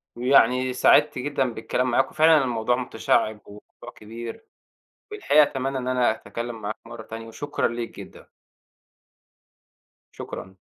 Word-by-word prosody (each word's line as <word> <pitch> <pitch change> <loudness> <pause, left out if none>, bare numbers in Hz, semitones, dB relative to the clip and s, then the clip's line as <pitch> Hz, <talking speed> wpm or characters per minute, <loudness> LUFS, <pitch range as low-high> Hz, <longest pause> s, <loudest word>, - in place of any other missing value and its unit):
ويعني 125 0 +3
سعِدت 145 +3 +4
جدًا 135 -2 -1
بالكلام 125 +3 -2
معاك، - - +1
وفعلًا 155 -2 +5
الموضوع 120 -1 0
مُتشعِّب، 110 -3 0
والموضوع 105 +1 -13
كبير، 115 - -9 0.6
في 425 - -7
الحقيقة 150 - +4
أتمنى 135 -1 -2
إن 125 -1 -4
أنا 125 -3 +2
أتكلّم 115 +1 -6
معاك 105 +1 -4
مرّة 115 -1 -9
تانية، 115 +1 -9
وشكرًا 145 +6 -2
ليك 120 0 -6
جدًا. - - -13 1.8
شكرًا. 95 +1 -9
125 Hz, 130 wpm, -24 LUFS, 115-135 Hz, 1.8 s, وفعلًا